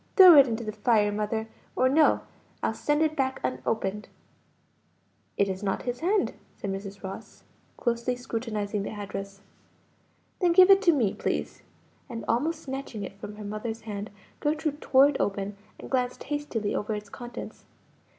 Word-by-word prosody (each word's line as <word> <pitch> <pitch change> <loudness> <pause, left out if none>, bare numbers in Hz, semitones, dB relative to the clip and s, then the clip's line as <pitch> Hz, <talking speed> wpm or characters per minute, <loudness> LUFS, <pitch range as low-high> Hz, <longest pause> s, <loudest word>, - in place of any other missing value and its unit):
"Throw 370 -5 +10
it 280 -2 +8
into 230 0 -2
the 215 - -3
fire, 210 -1 +2
mother, 215 +2 -2 0.3
or 255 - +3
no; 300 +4 +4 0.4
I'll - - +1
send 295 +1 +1
it 310 -1 +1
back 265 -2 0
unopened." 190 - -2 1.3
"It 200 - +3
is 190 0 -3
not 195 -2 -1
his 245 -1 -3
hand," 390 +5 +1 0.2
said 200 - -4
Mrs. 195 +1 -7
Ross, 195 +3 -8 0.3
closely 235 +1 0
scrutinizing 225 -4 -3
the 200 - -4
address. 200 -1 -6 1.0
"Then 355 -2 +3
give 370 +2 +8
it 390 0 +7
to 355 - +5
me, 240 -11 +1
please;" - - -3 0.5
and 230 -2 -6
almost 310 +8 0
snatching 265 -6 -5
it 195 0 -8
from 210 0 -7
her 210 0 -8
mother's 220 +2 -4
hand, 210 -1 -5 0.3
Gertrude 305 0 -1
tore 270 +1 +6
it 290 - -2
open, 200 0 -1 0.2
and - - -8
glanced 250 -1 0
hastily 290 -8 -2
over 210 +1 -1
its 210 -1 -7
contents. 240 +2 -8
225 Hz, 160 wpm, -27 LUFS, 205-275 Hz, 1.3 s, Throw